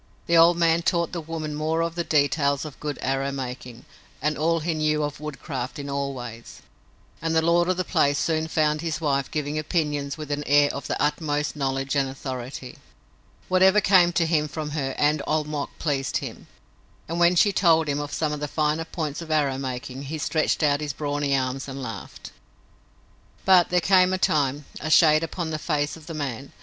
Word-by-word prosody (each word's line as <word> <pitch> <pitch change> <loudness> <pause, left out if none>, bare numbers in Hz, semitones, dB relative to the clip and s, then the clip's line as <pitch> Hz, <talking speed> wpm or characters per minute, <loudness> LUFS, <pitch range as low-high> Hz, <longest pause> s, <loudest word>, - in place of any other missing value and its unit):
The 170 - +2
old 170 +1 +6
man 165 0 +3
taught 170 -1 0
the 170 - -4
woman 155 -1 -5
more 155 +2 -1
of 165 0 -2
the 170 0 -2
details 145 -2 +1
of 150 - -9
good 150 -2 -4
arrow 135 +1 0
making 125 -3 -7 0.3
and 150 +2 0
all 165 +2 +1
he 165 +1 -1
knew 155 -1 +1
of 145 -1 -4
woodcraft 140 -3 -5
in 140 -1 -5
all 140 0 -2
ways, 120 -2 -9 0.6
and 165 0 -1
the 160 - +4
lord 170 +1 +3
of 185 - +1
the 185 - 0
place 145 -4 +2
soon 160 +1 0
found 155 -1 +1
his 160 -2 -2
wife 140 -4 0
giving 150 0 -2
opinions 150 -3 -1
with 150 -2 -7
an 145 0 -1
air 145 0 +5
of 140 - -6
the - - -2
utmost 150 0 -1
knowledge 135 -1 -1
and 135 -1 +1
authority. 130 -1 -7 0.7
Whatever 190 +2 +5
came 185 -3 +5
to 170 -1 +2
him 155 -2 +1
from 150 0 -5
her 135 -3 -2
and 150 0 +2
Old 155 0 +1
Mok 150 -2 -3
pleased 140 -4 -1
him, - - -7 0.6
and 170 +2 -3
when 175 +1 +5
she 205 +4 +5
told 165 -4 +4
him 145 0 -1
of 145 0 -5
some 155 -2 -1
of 150 - -4
the 150 - -3
finer 155 +2 0
points 155 -2 -4
of 165 - -9
arrow 145 -4 +1
making 130 0 -5
he 155 +4 -4
stretched 155 +1 0
out 145 0 +2
his 150 -2 -3
brawny 145 -1 -1
arms 130 +1 -2
and 135 0 -6
laughed. 115 -6 -8 1.1
But 185 -2 +6
there 180 - +3
came, 185 0 +4
in 185 - -1
time, 145 -3 +1
a 155 - -4
shade 155 -1 +6
upon 165 0 -4
the 155 - -3
face 150 -2 -1
of 160 -2 -14
the 165 - -6
man. 140 -3 -5
150 Hz, 205 wpm, -24 LUFS, 140-165 Hz, 1.1 s, old